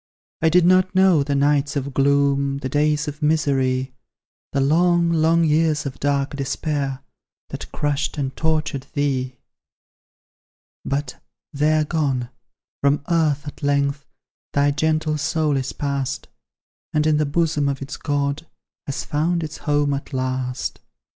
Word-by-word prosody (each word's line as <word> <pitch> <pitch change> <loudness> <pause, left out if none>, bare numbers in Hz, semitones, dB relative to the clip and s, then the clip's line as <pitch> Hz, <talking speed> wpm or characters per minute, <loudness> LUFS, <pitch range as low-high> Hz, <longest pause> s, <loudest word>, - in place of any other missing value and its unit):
I 160 - +4
did 175 +1 +4
not 185 +1 +4
know 190 -5 +5
the 140 0 -1
nights 140 0 +2
of 140 -1 -3
gloom, 140 0 +2
The 130 -1 -4
days 150 +2 +1
of 150 +1 -6
misery; 135 -4 +1 0.6
The - - 0
long, 170 +4 +3
long 165 +1 +3
years 155 -1 +2
of 135 -1 -5
dark 140 0 0
despair, 140 -1 -2 0.5
That - - -7
crushed 145 0 -1
and 135 -2 -2
tortured 155 -4 -1
thee. 130 -3 -1 1.5
But 140 -1 -3 0.3
they 150 +2 +2
are 155 - +3
gone; 140 -6 -1 0.5
from 140 +1 +2
earth 155 -3 +2
at 145 - -8
length 140 0 0 0.5
Thy 145 0 +3
gentle 155 +1 0
soul 150 0 +1
is 135 -1 -2
pass'd, 140 -2 -3 0.7
And 150 0 +2
in 155 -1 +3
the 150 -1 +1
bosom 150 -2 +1
of 135 -1 -3
its 140 +2 -6
God 145 +1 -2 0.4
Has 140 - -3
found 165 +3 0
its 155 -1 -6
home 145 -1 +1
at 140 +1 -5
last. 130 0 -2
145 Hz, 140 wpm, -22 LUFS, 140-155 Hz, 1.5 s, know